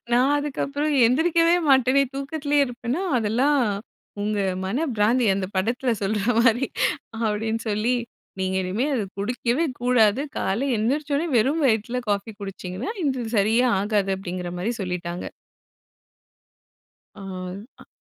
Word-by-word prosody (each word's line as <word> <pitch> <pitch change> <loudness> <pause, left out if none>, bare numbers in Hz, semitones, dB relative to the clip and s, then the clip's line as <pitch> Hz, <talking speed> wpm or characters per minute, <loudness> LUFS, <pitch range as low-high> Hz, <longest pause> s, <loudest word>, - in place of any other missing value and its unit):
நான் 255 +4 +4
அதுக்கப்புறம் 290 +1 -2
எந்திரிக்கவே 330 +6 +3
மாட்டனே 265 0 +5
தூக்கத்துலே 285 +1 -1
இருப்பேன்னா 245 +6 -3 0.2
அதெல்லாம் 245 +7 +2 0.7
உங்க 210 0 -1 0.3
மன 210 +8 -1 0.2
பிராந்தி 230 +4 +3
அந்த 190 -1 -2
படத்துல 235 +5 0
சொல்ற 210 +2 0 0.2
மாரி 240 +2 +3 0.5
அப்டின்னு 220 +1 -1
சொல்லி, 215 +4 +1 0.4
நீங்க 190 0 -1
இனிமே 195 +9 -1
அத 235 - 0 0.2
குடிக்கவே 240 +7 0 0.2
கூடாது. 245 -1 +3 0.2
காலைல 230 +9 0
எந்திரிச்ச 285 +7 -1
உடனே 305 +4 0
வெறும் 275 +8 +2
வயித்துல 235 +1 +1
காஃபி 205 +2 -1
குடிச்சிங்கனா 195 - -5
இது 260 -4 -1
சரியே 220 +5 +3
ஆகாது 200 -1 0
அப்டிங்கிற 180 -2 -5
மாரி 205 +7 -1
சொல்லிட்டாங்க. 180 -2 -4 1.9
ஆ. - - -12 0.6
அ. - - -15
235 Hz, 120 wpm, -24 LUFS, 205-270 Hz, 1.9 s, மாட்டனே